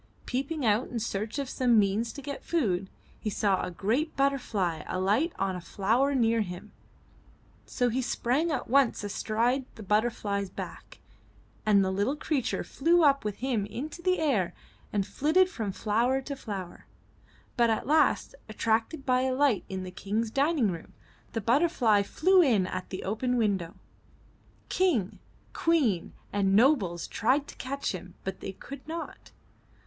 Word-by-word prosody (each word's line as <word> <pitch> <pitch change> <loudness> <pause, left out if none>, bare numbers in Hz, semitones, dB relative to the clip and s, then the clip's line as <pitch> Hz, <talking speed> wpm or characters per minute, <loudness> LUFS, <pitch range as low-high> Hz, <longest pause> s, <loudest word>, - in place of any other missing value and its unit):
Peeping 275 +3 -2
out 215 +3 +2
in 245 - -5
search 215 +2 -3
of 280 -1 -2
some 250 -3 +2
means 210 +3 +2
to 280 - -9
get 280 +1 -6
food, 195 - 0 0.3
he 215 - -2
saw 200 -2 +1
a - - -3
great 225 - -1
butter 275 0 +2
fly 180 -10 -2
alight 205 - +1
on 195 -1 -1
a 180 - -6
flower 235 +11 +1
near 230 -2 +3
him, 190 +1 -6 1.0
so 245 - 0
he 245 +2 0
sprang 260 +6 0
at 290 -5 -2
once 265 -3 +3
astride 230 +6 0
the 220 - -9
butterfly's 205 -1 0
back - - -8 0.7
and 200 -2 +5
the 190 - 0
little 205 +9 0
creature 280 -5 -1
flew 335 +4 +2
up 280 -3 +4
with 210 -2 -2
him 225 -7 0
into 295 +10 -6
the 365 +1 +2
air 215 - +1 0.4
and 200 -2 0
flitted 320 - +3
from 220 - -4
flower 230 +6 +1
to 280 +1 -5
flower. 200 -8 -7 0.7
But 235 -2 +3
at 220 - 0
last, 310 - +2 0.2
attracted 225 +7 0
by 255 -2 +3
a 260 0 0
light 270 -7 +2
in 190 -1 -4
the 185 - -7
King's 210 +4 -2
dining 275 - +2
room, 165 -2 -8 0.4
the 225 - -1
butterfly 240 - +3
flew 370 - +4
in 225 - +3
at 185 0 -5
the 185 - -5
open 245 +5 -1
window. 195 -6 0 0.9
King, 295 - +1 0.3
Queen 265 - +1 0.2
and 195 -1 +2
nobles 210 - +3
tried 275 +6 +1
to - - -10
catch 275 +2 -3
him, 185 -1 -8
but 190 -1 -4
they 195 - -6
could 275 +8 -10
not. 330 +1 -7
230 Hz, 160 wpm, -28 LUFS, 200-275 Hz, 1.0 s, and